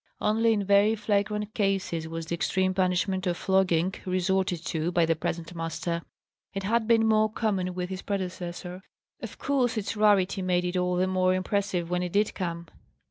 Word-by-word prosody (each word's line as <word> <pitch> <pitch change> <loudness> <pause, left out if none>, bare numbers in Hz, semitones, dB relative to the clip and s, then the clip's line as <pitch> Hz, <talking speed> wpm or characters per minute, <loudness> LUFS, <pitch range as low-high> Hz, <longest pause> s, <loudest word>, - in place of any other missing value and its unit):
Only 225 +2 +2
in 205 -2 0
very 200 +2 +4
flagrant 210 0 -1
cases 195 -5 -1
was 165 0 -5
the 170 - -4
extreme 185 +2 +1
punishment 185 0 0
of 175 -1 0
flogging 190 -2 +2
resorted 185 -2 0
to 160 +1 -1
by 170 -1 +3
the 165 0 +1
present 165 +2 -4
master. 170 0 -3 0.5
It 195 - -3
had 220 +2 +1
been 225 -1 +4
more 215 -1 +3
common 190 -5 -1
with 180 0 -3
his 190 0 -4
predecessor. 180 -2 -5 0.4
Of - - -7
course 250 -5 0
its 215 +1 -2
rarity 200 -2 +3
made 180 -1 +1
it 180 +1 -2
all 180 0 +1
the 180 +1 +2
more 185 0 +2
impressive 185 -2 -1
when 180 0 +1
it 180 -1 -4
did 205 +1 +2
come. 170 -2 -4
185 Hz, 180 wpm, -27 LUFS, 180-205 Hz, 0.5 s, very